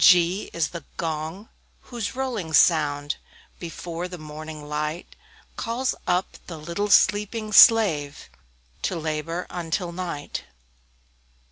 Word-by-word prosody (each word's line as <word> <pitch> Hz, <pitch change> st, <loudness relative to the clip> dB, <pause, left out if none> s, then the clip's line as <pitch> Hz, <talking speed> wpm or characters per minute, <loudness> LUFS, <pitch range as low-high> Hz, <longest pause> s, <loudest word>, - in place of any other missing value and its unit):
G 180 Hz, +2 st, +5 dB
G -, -, -12 dB
is 165 Hz, -3 st, 0 dB
the 170 Hz, -3 st, -7 dB
Gong, 160 Hz, +5 st, -4 dB, 0.3 s
whose 235 Hz, -2 st, -5 dB
rolling 235 Hz, -11 st, -3 dB
sound, 145 Hz, -3 st, +3 dB, 0.4 s
Before 170 Hz, 0 st, -5 dB
the 180 Hz, 0 st, -8 dB
morning 155 Hz, -1 st, -8 dB
light, 150 Hz, +3 st, -4 dB, 0.4 s
Calls 245 Hz, +2 st, -1 dB
up 180 Hz, +1 st, 0 dB
the 165 Hz, -, -7 dB
little 170 Hz, +7 st, -3 dB
sleeping 210 Hz, +2 st, +3 dB
slave, 165 Hz, -12 st, +6 dB, 0.5 s
To 185 Hz, -, -1 dB
labor 160 Hz, +2 st, -3 dB
until 175 Hz, +1 st, -2 dB
night. 170 Hz, -5 st, -5 dB
170 Hz, 115 wpm, -25 LUFS, 155-200 Hz, 0.5 s, slave